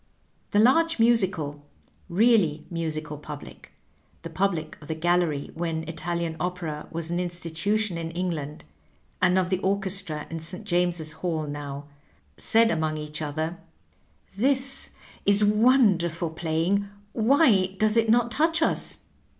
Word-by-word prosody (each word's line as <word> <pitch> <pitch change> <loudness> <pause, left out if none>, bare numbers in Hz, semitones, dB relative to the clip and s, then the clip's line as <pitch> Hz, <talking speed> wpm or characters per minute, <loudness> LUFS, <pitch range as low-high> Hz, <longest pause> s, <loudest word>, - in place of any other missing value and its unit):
The - - 0
large 325 +10 +4
musical, 190 -11 +2 0.5
really 185 -6 +3
musical 155 -3 -3
pub 150 -1 -8
lic - - -14 0.3
— - - -37
the 165 - -7
public 175 -1 -1
of 145 - -12
the 160 - -3
gallery 170 -3 0
when 165 -1 -3
Italian 170 0 -3
opera 175 -4 -4
was 165 0 -4
an 175 - 0
institution 180 +3 -1
in 165 0 -4
England, 165 - -4 0.6
and 185 0 +4
of 185 0 +1
the 185 - +1
orchestra 190 -5 0
in 165 - -4
St. 180 +6 -6
James's 175 -4 0
Hall 160 -2 -3
now 145 -1 -6 0.3
— - - -34 0.2
said 225 0 +3
among 155 -1 -1
each 150 +1 -6
other, 155 +3 -3 0.8
"This 270 +4 0 0.4
is 200 +1 +5
wonderful 205 -7 +3
playing; 170 +5 0 0.3
why 220 - +3
does 215 +1 +2
it 225 -1 +3
not 240 +1 +3
touch 325 +6 +2
us?'' - - 0
175 Hz, 140 wpm, -26 LUFS, 160-210 Hz, 0.8 s, is